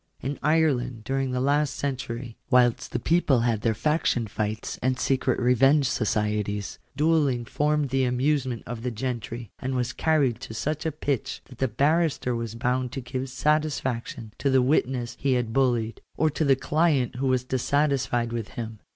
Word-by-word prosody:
In 140 +3 -4
Ireland, 135 -7 +1
during 135 +3 -1
the 125 0 -1
last 145 +2 +1
century, 125 -3 -4
whilst 125 -2 +3
the - - -1
people 155 -7 +2
had 115 -3 +1
their 110 +1 +1
faction 150 -3 +1
fights 110 +1 -3
and 130 0 +1
secret 130 -1 +1
revenge 135 +3 +4
societies, 105 -3 -1 0.2
duelling 145 -6 +2
formed 150 +2 0
the 135 0 +1
amusement 130 -1 0
of 120 0 -6
the 125 - -2
gentry, 120 -2 -4
and 130 0 -3
was 125 -1 -1
carried 145 -8 +1
to 110 - -8
such 150 +6 -2
a - - 0
pitch 140 -3 -3
that 125 - -15
the 130 - +2
barrister 140 +1 +1
was 115 -1 -4
bound 125 +1 -1
to 135 - -4
give 130 +1 -4
satisfaction 130 -6 -1
to 140 - +1
the 130 -1 +4
wit 135 0 +3
ness 120 -2 -4
he 135 -1 +2
had 120 -3 -1
bullied, 120 -4 +1 0.2
or 155 0 +2
to 155 - -1
the 140 -2 +5
client 145 -3 +1
who 135 +1 0
was 130 -1 +2
dissatisfied 130 -2 0
with 115 -3 -3
him*. 110 -2 -5
130 Hz, 175 wpm, -26 LUFS, 120-140 Hz, 0.2 s, the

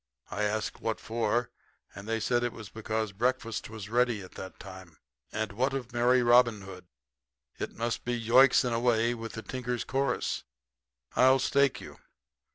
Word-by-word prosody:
I 105 - -1
asked 105 +1 -2
what 115 -1 -2
for, 115 +1 -1 0.4
and 100 +2 -9
they 115 0 0
said 120 +2 +1 0.3
because 110 -1 -2
breakfast 120 +2 -1
was 110 -3 -8
ready 120 -2 +1
at 90 - -12
that 95 - -9
time. 95 -4 -11 0.3
And 110 -1 -2
what 130 +6 0
of 125 -2 -5
merry 125 +1 +3
Robin 120 -3 +5
Hood? 95 -2 -11 0.7
It - - -4
must 115 +1 -2
be 120 0 -2
Yoicks! 125 +4 +5
and 125 -2 -1
away 115 0 +2
with 115 -1 -7
the 110 - -6
tinkers' 125 -2 -3
chorus. 135 -1 -1 0.7
I'll 130 +1 +6
stake 140 +1 +2
you. - - -11
115 Hz, 160 wpm, -29 LUFS, 110-125 Hz, 0.7 s, I'll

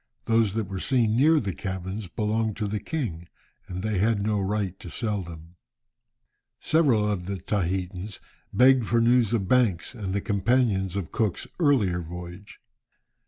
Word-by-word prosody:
Those 115 -3 +2
that 110 -3 -1
were 95 0 -5
seen 115 -2 +2
near 155 +5 +5
the 100 -7 -3
cabins 95 +1 -5
belonged 110 +3 -1
to 105 -2 -1
the 105 +1 -2
king, 95 - -4 0.4
and 90 +1 -5
they 110 -3 0
had 110 +1 +2
no 105 -1 +1
right 95 -1 -2
to 90 - -9
sell 105 +1 -2
them. 85 0 -11 1.0
Several 135 -10 +3
of 95 -4 -2
the 100 - -2
Tahitans 95 +1 -3 0.3
begged 130 -2 +5
for 115 - +2
news 120 -1 +3
of 105 -5 0
Banks 115 -6 +2
and 105 -6 -5
the 100 - 0
companions 100 -2 +1
of 95 -5 -3
Cook's 110 -5 -1
earlier 115 - +2
voyage. 90 +3 -9
105 Hz, 160 wpm, -26 LUFS, 95-115 Hz, 1.0 s, near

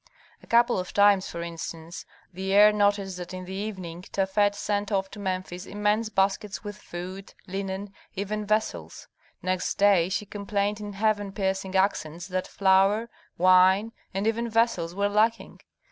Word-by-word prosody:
A - - -18
couple 235 -2 +4
of 180 - -6
times, 200 -2 +5
for 170 - -5
instance, 165 0 -7 0.3
the 190 +2 -4
heir 210 +1 +7
noticed 205 -2 +1
that 180 +1 -7
in 185 0 -7
the 185 - -7
evening 190 -4 -5
Tafet 200 +2 +1
sent 205 0 -2
off 195 -1 0
to 210 - -9
Memphis 185 -1 -4
immense 210 +2 0
baskets 200 +1 0
with 205 -1 -6
food, 185 0 -8
linen, 195 +1 -5 0.2
even 210 +2 -3
vessels. 85 - -2 0.4
Next 185 0 -1
day 195 -4 +4
she 195 +2 -2
complained 205 +1 -2
in 205 -1 -6
heaven 205 -1 0
piercing 190 -1 -2
accents 175 -4 0
that 185 0 -2
flour, 195 +4 +3 0.3
wine, 185 +4 +5 0.2
and 195 +2 -2
even 230 +1 0
vessels 225 -7 +1
were 200 +1 +1
lacking. 215 +3 0
195 Hz, 155 wpm, -26 LUFS, 185-210 Hz, 0.4 s, heir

